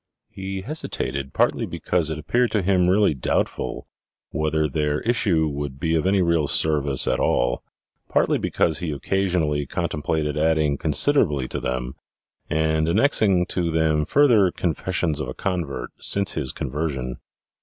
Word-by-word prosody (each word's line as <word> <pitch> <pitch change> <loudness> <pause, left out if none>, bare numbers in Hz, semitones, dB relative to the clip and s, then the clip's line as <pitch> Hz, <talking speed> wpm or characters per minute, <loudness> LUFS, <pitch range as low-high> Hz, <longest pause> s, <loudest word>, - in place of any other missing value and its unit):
He 95 0 -5
hesitated 70 - -3
partly - - +1
because 85 -3 -1
it 80 - -3
appeared 120 +11 +1
to 105 -3 +1
him 90 -1 +3
really 100 -1 +4
doubtful 60 -1 -2 0.4
whether 80 0 0
their 75 +1 -1
issue 95 -9 +1
would 70 -2 -5
be 80 +2 0
of 80 +1 +1
any 95 -1 +3
real 85 -3 +2
service 70 -4 +1
at - - +1
all, - - +1 0.5
partly - - +2
because 80 -2 0
he 90 -3 -3
occasionally 80 -2 0
contemplated 75 +1 -2
adding 80 -2 +2
con 75 - -1
siderably 75 - +2
to - - -3
them, 65 0 -3 0.6
and 80 0 +1
annexing 100 - +3
to 85 -2 -1
them 80 -1 +2
further 115 - +4
"confessions 85 -2 -1
of 75 - -3
a - - -6
convert" 75 -10 -3
since 100 -1 0
his 70 -5 -3
conversion. 65 -3 -3
80 Hz, 145 wpm, -23 LUFS, 75-95 Hz, 0.6 s, really